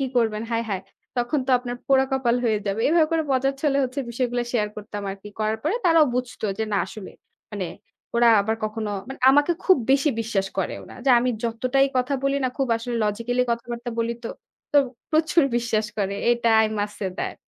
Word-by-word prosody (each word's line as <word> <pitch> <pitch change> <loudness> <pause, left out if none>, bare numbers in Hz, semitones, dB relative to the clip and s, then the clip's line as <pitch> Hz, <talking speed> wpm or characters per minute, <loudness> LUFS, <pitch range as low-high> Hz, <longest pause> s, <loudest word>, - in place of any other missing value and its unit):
কী 270 - 0
করবেন? 220 -2 +1
হায়, 230 0 0
হায়! 190 -1 -2 0.3
তখন 245 +5 0
তো - - 0
আপনার 245 0 -5
পোড়া 265 -1 +4
কপাল 250 -2 +2
হয়ে 220 -3 +2
যাবে।" 200 +3 -1
এভাবে 320 0 +4
করে 325 - +2
মজাচ্ছলে 275 +2 +1
হচ্ছে 260 +2 -3
বিষয়গুলা 245 0 -1
শেয়ার 210 -4 +1
করতাম 210 -1 -6
আর 195 - -6
কি। 210 - -9
করার 215 0 0
পরে 320 +9 0
তারাও 330 -3 +6
বুঝতো 250 -3 -3
যে 220 - 0
না - - +2
আসলে 210 -3 -9 0.4
মানে 200 -3 -3 0.5
ওরা 235 0 +5
আবার 220 +2 -1
কখনো 215 0 -3 0.2
মানে 265 - -8
আমাকে 290 +5 +4
খুব 375 - +6
বেশি 275 +2 +4
বিশ্বাস 215 -4 -1
করে 190 - -1
ওনারা। - - -12
যা - - +6
আমি 250 +1 +1
যতটাই 255 +4 +2
কথা 255 +2 +1
বলি 275 0 +1
না 255 - +2
খুব 270 -2 0
আসলে 235 +1 -5
লজিক্যালি 230 +4 0
কথাবার্তা 235 +1 -3
বলি 230 0 0
তো, - - -2 0.4
তো - - +4 0.3
প্রচুর 320 +1 +3
বিশ্বাস 220 -2 0
করে। 200 0 0 0.2
এটা 235 -1 +2 0.2
i - - +3
must 205 0 -2
say 190 -2 -1
that. - - -3
240 Hz, 200 wpm, -24 LUFS, 220-270 Hz, 0.5 s, তারাও